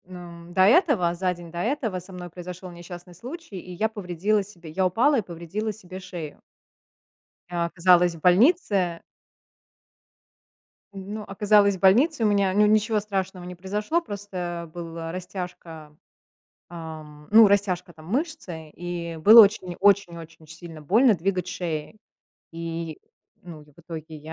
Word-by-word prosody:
Ну, 175 Hz, -1 st, -11 dB
до 185 Hz, -, +2 dB
этого, 215 Hz, -, +4 dB
за 180 Hz, +1 st, -1 dB
день 170 Hz, -1 st, -12 dB
до 170 Hz, -, -6 dB
этого, 225 Hz, -3 st, -1 dB
со 180 Hz, +2 st, -13 dB
мной 180 Hz, -1 st, -8 dB
произошел 180 Hz, +1 st, -9 dB
несчастный 175 Hz, +1 st, -11 dB
случай, 245 Hz, -, -9 dB
и 180 Hz, -, -11 dB
я 215 Hz, +5 st, 0 dB
повредила 205 Hz, 0 st, -1 dB
себе 175 Hz, -5 st, -12 dB
Я 190 Hz, +4 st, 0 dB
упала 250 Hz, +9 st, +3 dB
и -, -, 0 dB
повредила 185 Hz, +4 st, -5 dB
себе 190 Hz, -3 st, -10 dB
шею. 175 Hz, -5 st, -8 dB, 1.1 s
Я 170 Hz, -1 st, -1 dB
оказалась 175 Hz, 0 st, +3 dB
в -, -, -12 dB
больнице 185 Hz, -, +3 dB, 1.9 s
Ну 200 Hz, +2 st, -7 dB
оказалась 205 Hz, 0 st, +3 dB
в -, -, -18 dB
больнице, 235 Hz, -, +4 dB
у -, -, +4 dB
меня 200 Hz, -2 st, +2 dB
ню 210 Hz, +2 st, +4 dB
ничего 215 Hz, +1 st, +2 dB
страшного 190 Hz, -3 st, -4 dB
не 180 Hz, 0 st, -8 dB
произошло. 210 Hz, -, -1 dB
Просто 180 Hz, -, -5 dB
была 165 Hz, -1 st, -6 dB
растяжка, 180 Hz, -4 st, -8 dB, 0.7 s
ам, 155 Hz, -3 st, -10 dB
ну, 220 Hz, 0 st, +8 dB
растяжка, 185 Hz, -3 st, 0 dB
там, 155 Hz, -1 st, -15 dB
мышцы, 210 Hz, -, -4 dB
и 170 Hz, -1 st, -6 dB
было 215 Hz, +8 st, +9 dB
очень 195 Hz, -4 st, +2 dB
очень-очень 170 Hz, -5 st, +1 dB
сильно 160 Hz, 0 st, -11 dB
больно 220 Hz, -, +4 dB
двигать 185 Hz, +1 st, -2 dB
шеей. 170 Hz, +1 st, -4 dB, 0.6 s
И, 165 Hz, -1 st, -5 dB, 0.4 s
ну, 165 Hz, -4 st, -11 dB
и 150 Hz, -, -21 dB
в -, -, -33 dB
итоге 160 Hz, -2 st, -9 dB
я 155 Hz, +2 st, -10 dB
180 Hz, 145 wpm, -25 LUFS, 170-205 Hz, 1.9 s, было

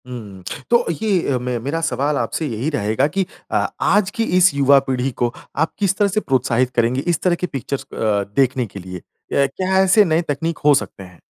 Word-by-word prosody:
हुँ। 105 Hz, -7 st, -9 dB, 0.3 s
तो 235 Hz, -, +3 dB, 0.2 s
ये 195 Hz, -9 st, +1 dB
अ, -, -, +1 dB
मे 125 Hz, 0 st, -3 dB
मेरा 140 Hz, +8 st, -3 dB
सवाल 150 Hz, -2 st, 0 dB
आपसे 160 Hz, -, -2 dB
यही 120 Hz, +3 st, -2 dB
रहेगा 110 Hz, -1 st, 0 dB
कि 190 Hz, +5 st, -1 dB, 0.3 s
अ, -, -, +1 dB
आज 205 Hz, -2 st, +3 dB
की 230 Hz, -, -1 dB
इस 185 Hz, -2 st, +5 dB
युवा 140 Hz, 0 st, +5 dB
पीढ़ी 130 Hz, +1 st, 0 dB
को 120 Hz, 0 st, +1 dB, 0.2 s
आप 160 Hz, +3 st, 0 dB
किस 195 Hz, -2 st, +1 dB
तरह 205 Hz, -, +3 dB
से 200 Hz, +2 st, 0 dB
प्रोत्साहित 130 Hz, -, +1 dB
करेंगे 120 Hz, +3 st, +1 dB
इस 170 Hz, -3 st, +1 dB
तरह 180 Hz, -2 st, +2 dB
की 180 Hz, -, -3 dB
पिक्चर्स 135 Hz, -1 st, -4 dB
अ, -, -, -7 dB, 0.4 s
देखने 130 Hz, -2 st, +2 dB
के 100 Hz, -, -10 dB
लिए? 90 Hz, -1 st, -8 dB, 0.3 s
या 140 Hz, -, +4 dB
क्या 185 Hz, +7 st, -1 dB
ऐसे 195 Hz, +3 st, +5 dB
नए 165 Hz, -1 st, +2 dB
तकनीक 160 Hz, +3 st, -2 dB
हो 150 Hz, -, +7 dB
सकते 100 Hz, -4 st, -3 dB
हैं? 90 Hz, -2 st, -16 dB
140 Hz, 210 wpm, -20 LUFS, 125-175 Hz, 0.4 s, हो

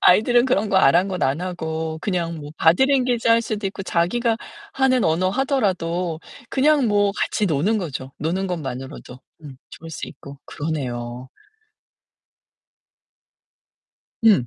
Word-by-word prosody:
아이들은 240 Hz, +6 st, +5 dB
그런 220 Hz, -5 st, +1 dB
거 195 Hz, -, +1 dB
아랑곳 185 Hz, +3 st, +3 dB
안 135 Hz, +5 st, +1 dB
하고 160 Hz, -3 st, -4 dB
그냥 170 Hz, -4 st, -2 dB
뭐 145 Hz, 0 st, -8 dB
바디 170 Hz, +11 st, +4 dB
랭귀지 250 Hz, -4 st, +1 dB
할 230 Hz, 0 st, +5 dB
수도 210 Hz, -2 st, -3 dB
있고 195 Hz, 0 st, -5 dB
자기가 225 Hz, +7 st, +1 dB, 0.4 s
하는 260 Hz, -, +2 dB
언어 170 Hz, +3 st, +2 dB
하더라도 185 Hz, -, -1 dB, 0.3 s
그냥 280 Hz, 0 st, +3 dB
뭐 205 Hz, -1 st, +2 dB
같이 210 Hz, -, 0 dB
노는 180 Hz, +8 st, +1 dB
거죠. 135 Hz, -7 st, -5 dB
노는 180 Hz, +5 st, -1 dB
것만으로도 135 Hz, -6 st, -6 dB, 0.2 s
음 140 Hz, -3 st, -10 dB
좋을 165 Hz, 0 st, -10 dB
수 160 Hz, -, -6 dB
있고 140 Hz, 0 st, -12 dB
그러네요. 125 Hz, -5 st, -4 dB, 3.0 s
음. 200 Hz, -, +5 dB
180 Hz, 265 characters per minute, -22 LUFS, 155-220 Hz, 3.0 s, 아이들은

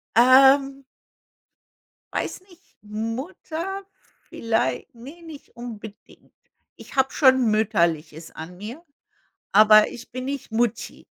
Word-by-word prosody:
Ähm. 270 Hz, +3 st, +5 dB, 1.3 s
Weiß -, -, -3 dB
nicht, 355 Hz, -1 st, -20 dB, 0.2 s
M- 215 Hz, +2 st, -4 dB
Mutter, 350 Hz, +6 st, -6 dB, 0.4 s
vielleicht 225 Hz, -, -2 dB
ne, 275 Hz, +9 st, -13 dB
nicht 320 Hz, -4 st, -12 dB
unbedingt. 220 Hz, -3 st, -11 dB, 0.4 s
Ich -, -, -13 dB
habe 265 Hz, 0 st, +2 dB
schon 260 Hz, -5 st, +4 dB
Mütterliches 170 Hz, -7 st, -1 dB
an 170 Hz, +3 st, -10 dB
mir, 230 Hz, -, -9 dB, 0.7 s
aber 215 Hz, +1 st, +7 dB
ich 240 Hz, -, -11 dB
bin 255 Hz, +1 st, -6 dB
nicht 275 Hz, -2 st, -5 dB
Mutti. 235 Hz, 0 st, -2 dB
240 Hz, 105 wpm, -23 LUFS, 215-275 Hz, 1.3 s, aber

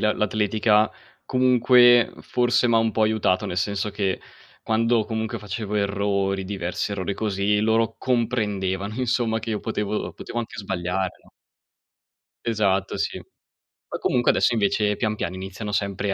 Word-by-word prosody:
la 105 Hz, 0 st, +2 dB
l'atletica 105 Hz, +1 st, +2 dB, 0.3 s
comunque 125 Hz, -1 st, +5 dB
forse 120 Hz, 0 st, +1 dB
m'ha 115 Hz, -1 st, +4 dB
un 115 Hz, -1 st, +1 dB
po' 110 Hz, -, +1 dB
aiutato, 110 Hz, -4 st, +1 dB
nel 90 Hz, -, -4 dB
senso 100 Hz, +3 st, -1 dB
che 100 Hz, -2 st, -1 dB, 0.4 s
quando 115 Hz, 0 st, +2 dB
comunque 110 Hz, +1 st, -3 dB
facevo 105 Hz, 0 st, -5 dB
errori, 100 Hz, -1 st, 0 dB
diversi 95 Hz, 0 st, -3 dB
errori 100 Hz, 0 st, -3 dB
così, 105 Hz, -1 st, 0 dB
loro 110 Hz, +1 st, +2 dB
comprendevano 105 Hz, -5 st, -1 dB
insomma, 120 Hz, -2 st, 0 dB
che 110 Hz, +1 st, -5 dB
io 105 Hz, -, -2 dB
potevo 105 Hz, -1 st, -3 dB
potevo 120 Hz, -, -6 dB
anche 115 Hz, -1 st, -5 dB
sbagliare, 95 Hz, -1 st, -2 dB
no? -, -, -21 dB, 1.2 s
Esatto, 100 Hz, -4 st, 0 dB
sì. -, -, -2 dB, 0.7 s
Poi -, -, -4 dB
comunque 120 Hz, -1 st, +2 dB
adesso -, -, +2 dB
invece, 105 Hz, -1 st, +1 dB
pian 110 Hz, -1 st, -1 dB
piano 90 Hz, -1 st, -3 dB
iniziano 95 Hz, +3 st, -6 dB
sempre 100 Hz, 0 st, -1 dB
105 Hz, 140 wpm, -24 LUFS, 100-115 Hz, 1.2 s, comunque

